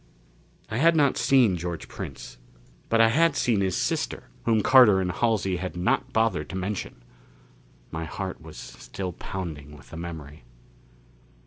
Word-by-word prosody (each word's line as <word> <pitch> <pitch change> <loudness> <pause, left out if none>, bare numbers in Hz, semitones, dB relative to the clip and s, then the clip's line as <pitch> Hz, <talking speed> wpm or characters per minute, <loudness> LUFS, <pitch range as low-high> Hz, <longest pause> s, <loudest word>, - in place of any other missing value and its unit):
I 110 - -1
had 165 +5 +4
not 145 -4 +3
seen 120 -6 +4
George 85 -1 -5
Prince. - - -8 0.5
But 115 - +3
I 115 0 +6
had 165 +4 +3
seen 115 -7 +1
his 95 -2 0
sister, - - -2 0.2
whom 110 -3 +2
Carter 125 -7 +7
and 90 -1 -1
Halsey 100 -4 0
had 90 0 -5
not 90 - 0
bothered 115 0 0
to - - -6
mention. 95 -10 -4 0.9
My 80 0 -4
heart - - -5
was - - -12
still 90 +9 -7
pounding 75 -6 -7
with - - -18
the 80 - -8
memory. 80 -4 -8
95 Hz, 150 wpm, -26 LUFS, 85-115 Hz, 0.9 s, Carter